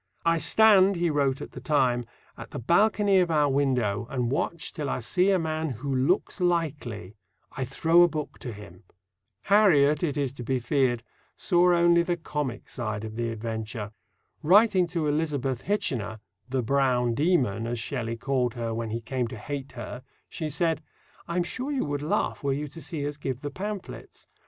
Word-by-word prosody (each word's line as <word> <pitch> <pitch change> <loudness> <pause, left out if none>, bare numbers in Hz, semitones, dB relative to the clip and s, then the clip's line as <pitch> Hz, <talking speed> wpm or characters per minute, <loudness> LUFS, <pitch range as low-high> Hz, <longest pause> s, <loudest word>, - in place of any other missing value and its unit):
"I 165 0 +3
stand," 200 -1 +5
he 170 -1 +1
wrote 140 -2 +1
at - - -7
the - - -9
time, 125 -5 +1 0.3
"at - - -10
the - - -7
balcony 200 - +3
of 180 -2 +2
our 150 -2 +3
window, 125 -7 0
and 125 -3 -1
watch 160 +3 -2
till 150 -4 -3
I - - -1
see 180 - +2
a 195 - +4
man 160 -1 -2
who 135 +3 -4
looks 145 +9 0
likely; 145 - -1 0.4
I 130 - -2
throw 165 +6 +3
a 175 - +7
book 155 -2 -5
to 125 - -6
him." 100 -4 -12 0.6
Harriet, 155 -8 +5
it 150 -4 -1
is 140 -3 0
to 125 - -8
be 130 +2 0
feared, 125 -1 +1 0.3
saw 180 0 +3
only 170 0 +5
the 175 0 -1
comic 150 -6 -4
side 110 -4 -4
of 110 0 -7
the 115 0 -2
adventure. 110 -1 -5 0.5
Writing 190 +1 +5
to 165 -2 -2
Elizabeth 145 -4 -1
Hitchener 115 - -2 0.3
"the 130 -1 -1
Brown 125 -2 +2
Demon," 125 - +1
as 120 +1 -2
Shelley 115 0 -3
called 125 -1 -1
her 115 -1 -3
when 115 0 -3
he 115 +2 -3
came 125 +1 -2
to 115 - -8
hate 140 +4 -6
her 120 +1 -7 0.3
she 155 -3 -4
said: 165 +2 0 0.5
I'm 175 +1 0
sure 255 - -4
you 275 - 0
would 145 -1 -3
laugh 150 - -1
were 140 -1 +1
you 150 +2 -3
to 165 +4 -10
see 155 -4 -4
us 145 0 -5
give 135 -3 -4
the 145 - -5
pamphlets. 200 +4 -7
140 Hz, 185 wpm, -27 LUFS, 120-170 Hz, 0.6 s, a